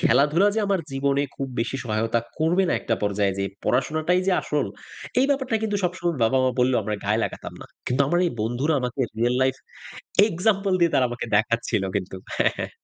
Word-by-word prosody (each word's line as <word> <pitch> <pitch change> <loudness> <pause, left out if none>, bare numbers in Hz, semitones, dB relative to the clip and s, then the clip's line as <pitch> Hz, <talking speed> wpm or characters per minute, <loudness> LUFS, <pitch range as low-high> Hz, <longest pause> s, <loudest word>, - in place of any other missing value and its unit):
খেলাধুলা 155 +8 +4
যে 220 - +1
আমার 195 -2 +1
জীবনে 140 +1 +1
খুব 135 -1 -3
বেশি 125 +3 -2
সহায়তা 115 +1 0 0.2
করবে 165 +4 +2
না - - +2
একটা 115 - 0
পর্যায়ে 100 -1 +1
যেয়ে 100 0 -1
পড়াশোনাটাই 155 +7 +1
যে 190 - +3
আসল, - - -1 0.5
এই 270 - +4
ব্যাপারটা 265 -5 +1
কিন্তু 210 -2 0
সবসময় 175 -2 -1
বাবা-মা 130 +2 +3
বললেও 125 -1 +3
আমরা 105 +1 -2
গায়ে 105 +2 +1
লাগাতাম - - -6
না। - - -10 0.2
কিন্তু 125 +2 0
আমার 175 +3 +2
এই - - 0
বন্ধুরা 125 +8 0
আমাকে 125 +1 -3 0.2
real 120 +2 +2
life 130 0 +1 0.7
example 195 +1 +1
দিয়ে 170 -1 +3
তারা 130 - +4
আমাকে 120 0 -5
দেখাচ্ছিল 115 -1 0
কিন্তু। 95 -1 -4 0.2
হ্যাঁ, - - +3
হ্যাঁ। - - -4
135 Hz, 185 wpm, -24 LUFS, 115-175 Hz, 0.7 s, খেলাধুলা